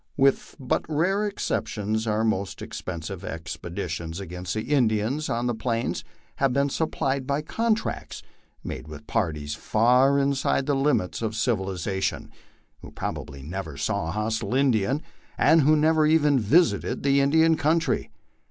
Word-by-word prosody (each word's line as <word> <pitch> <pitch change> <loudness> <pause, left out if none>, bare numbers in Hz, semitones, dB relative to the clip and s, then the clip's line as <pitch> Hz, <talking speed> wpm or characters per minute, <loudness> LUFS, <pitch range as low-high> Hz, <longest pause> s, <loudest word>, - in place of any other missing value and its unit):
With 135 -1 +2
but 130 -2 0
rare 190 +7 +1
exceptions 110 - -2
our 110 +1 +1
most 100 -4 -1
expensive 85 +1 -6
expeditions 85 0 -5
against 90 -1 -5
the 110 - -2
Indians 125 +1 +1
on 120 +1 -1
the 120 - +1
Plains 115 +1 -2 0.3
have 135 -2 +2
been 140 +1 +2
Bnpplied 135 -3 -1
by 140 +1 0
contracts 225 +6 -2 0.4
made - - -6
with 75 -1 -10
parties 75 -8 -1
far 125 - +3
inside 140 -1 +1
the 145 - +1
limits 135 -10 +1
of 110 -1 -2
civilization, 95 -4 -1 0.5
\vlio - - -11
probably 70 -2 -5
never 80 -1 -6
saw 75 +1 -1
a - - -2
hostile 110 +2 -2
Indian, 130 +1 +2 0.3
and 165 - +5
who 150 +2 +5
never 155 0 +3
even 150 -3 +4
visited 155 - +2
the 140 0 +4
In 140 0 +3
dian 160 +2 +4
country. 160 +2 +1
120 Hz, 145 wpm, -25 LUFS, 95-145 Hz, 0.5 s, and